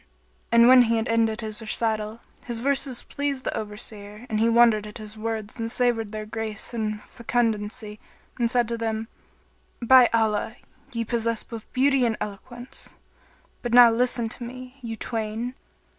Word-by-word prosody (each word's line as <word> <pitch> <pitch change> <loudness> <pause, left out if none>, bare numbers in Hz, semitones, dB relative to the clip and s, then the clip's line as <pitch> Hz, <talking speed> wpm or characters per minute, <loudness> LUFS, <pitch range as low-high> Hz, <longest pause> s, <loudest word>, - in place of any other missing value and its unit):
And 235 0 +7
when 255 0 +9
he 230 0 +1
had 225 +2 -1
ended 225 0 +1
his 215 0 -5
recital, 220 0 -1 0.2
his 240 -1 -3
verses 270 -1 +1
pleased 280 -2 -3
the - - -2
Overseer 210 +1 -6
and 215 - 0
he 225 +1 +3
wondered 230 -2 +4
at 210 - -9
his 215 -1 -9
words 220 -1 -4
and 225 0 -2
savoured 230 -3 0
their 215 -1 -5
grace 220 +1 -5
and 215 -2 -3
fecundity 220 -2 -2 0.4
and 235 -1 +2
said 240 -1 +2
to 235 -1 -3
them, 225 0 -2 0.7
"By 250 0 +7
Allah, 220 -1 +1 0.4
ye 230 -2 -2
possess 230 -1 -1
both 230 -2 -10
beauty 270 0 +3
and 230 -3 +1
eloquence. 240 +5 -8 0.7
But 240 0 -1
now 240 -1 +9
listen 240 0 +1
to 240 - -8
me, 255 +2 -9
you 225 -2 -5
twain!" 225 +2 -3
230 Hz, 160 wpm, -25 LUFS, 215-240 Hz, 0.7 s, when